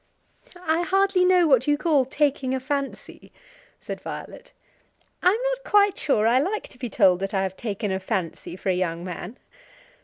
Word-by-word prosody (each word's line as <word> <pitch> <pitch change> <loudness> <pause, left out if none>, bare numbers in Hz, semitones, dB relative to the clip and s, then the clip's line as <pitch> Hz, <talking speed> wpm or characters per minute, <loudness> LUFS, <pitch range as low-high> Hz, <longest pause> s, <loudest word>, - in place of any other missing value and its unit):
"I 320 +2 +2
hardly 385 +1 +2
know 360 -1 +5
what 265 -4 +3
you 290 0 +3
call 295 -4 +2
taking 265 -1 0
a - - -2
fancy," 275 +1 -5 0.5
said - - -7
Violet. - - -8 0.7
"I 360 - +5
am 405 - +2 0.2
not - - -7
quite 405 -1 +3
sure 220 - +1
I 240 +3 +4
like 385 +9 -2
to 250 - -18
be 245 -2 -4
told 190 -5 +4
that 195 +1 -3
I 190 - +1
have 190 -1 -3
taken 205 -2 -3
a 190 - -1
fancy 185 -4 -4
for 190 - -4
a - - +3
young 175 -2 -2
man." 180 +5 -7
260 Hz, 185 wpm, -24 LUFS, -, 0.7 s, know